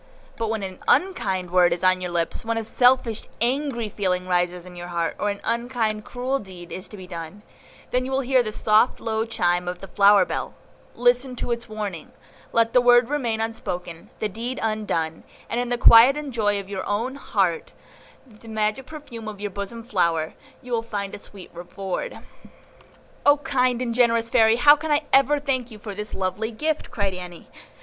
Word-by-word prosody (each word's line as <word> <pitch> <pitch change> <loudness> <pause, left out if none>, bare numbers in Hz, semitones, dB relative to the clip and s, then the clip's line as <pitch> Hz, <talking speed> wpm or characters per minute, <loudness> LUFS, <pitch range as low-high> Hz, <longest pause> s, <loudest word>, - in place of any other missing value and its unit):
But 225 -1 -2
when 220 -2 -2
an 185 -1 -6
unkind 190 - +1
word 180 -1 +5
is 175 - -2
on 185 0 +3
your 180 - -3
lips, 170 -1 -2
when 230 0 -1
a 225 - -2
selfish, 245 -1 +2
angry 245 -1 0
feeling 185 -3 -2
rises 180 0 0
in 180 -1 -11
your 175 0 -7
heart, 170 -1 -2
or 205 - 0
an 200 0 -3
unkind, 235 -3 -1
cruel 260 +2 -2
deed 180 -4 -11
is 185 - -6
to 210 - -11
be 185 - -9
done, 175 +3 -8 0.5
then 255 +1 0
will 270 0 0
you 255 - -7
hear 260 -1 +6
the 215 -3 -3
soft, 215 +3 +3
low 220 -1 -1
chime 180 -6 0
of 180 0 -3
the 195 - -10
flower 200 +2 +5
bell; - - -4 0.4
listen 245 +1 +2
to 245 - -4
its 235 -1 -3
warning, 205 -6 -6 0.4
let 230 0 +2
the 250 - +6
word 245 0 +5
remain 245 -7 -1
unspoken, 180 -7 -5
the 215 - -1
deed 235 +5 -5
undone, 205 -8 -2 0.2
and 235 - -2
in 245 0 -2
the 245 - 0
quiet 235 +3 +8 0.2
joy 205 -4 +1
of 195 - -8
your 195 -1 -4
own 225 +6 -1
heart, 195 -11 -1 0.5
and 225 -5 -18
the 230 - -14
magic 220 +3 -1
perfume 260 -8 -9
of 210 -2 -7
your 205 -1 -4
bosom 200 +4 -5
flower, 170 -8 0 0.3
you 250 - -10
will 230 -1 +1
find 205 -3 -5
a - - -6
sweet 195 -2 -12
reward." 190 - -5 1.1
"O 290 0 +6
kind 255 -4 0
and 235 -2 -2
generous 230 -1 +2
Fairy, 225 -2 +5
how 290 +5 +7
can 310 +1 -6
I 295 +1 +2
ever 275 +2 +5
thank 260 -4 -1
you 220 - -11
for 210 -1 -7
this 210 +2 -5
lovely 190 +4 -2
gift!" 305 +7 -2
cried 200 -5 -1
Annie. 180 -1 -9
220 Hz, 195 wpm, -24 LUFS, 190-245 Hz, 1.1 s, quiet